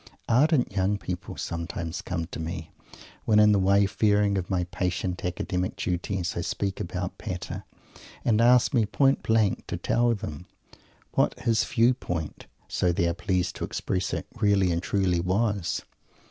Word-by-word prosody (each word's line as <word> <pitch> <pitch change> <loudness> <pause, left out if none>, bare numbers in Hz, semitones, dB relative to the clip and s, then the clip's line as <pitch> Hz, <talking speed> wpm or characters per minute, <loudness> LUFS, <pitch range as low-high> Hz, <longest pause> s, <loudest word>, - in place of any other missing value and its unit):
Ardent 135 +2 +3
young 100 +1 +1
people 90 -3 -6
sometimes 85 0 -4
come 85 -2 -3
to 85 - -8
me, 80 0 -5 0.5
when 105 - +4
in 105 0 +7
the 100 - +4
wayfaring 100 +1 +3
of 95 -2 -2
my 90 -2 +1
patient 90 0 -2
academic 90 +1 -2
duties, 90 0 -2
I 85 - -1
speak 95 +2 -2
about 90 +1 -4
Pater, 90 -2 -5 0.6
and 115 -1 +3
ask 125 +1 +5
me 115 -5 +3
point 135 +4 +3
blank 110 -3 +1
to - - -3
tell 120 0 +2
them 85 -3 -7 0.6
what - - +1
his 115 -1 +2
"view 120 +1 +3
point" 85 - -5 0.2
so 90 - +1
they 85 0 +1
are 85 - +1
pleased 90 -1 -1
to - - -4
express 95 -1 -2
it - - -3
"really 100 -4 +3
and 85 0 0
truly" 95 -3 +1
was. 100 +1 0
95 Hz, 160 wpm, -27 LUFS, 90-105 Hz, 0.6 s, in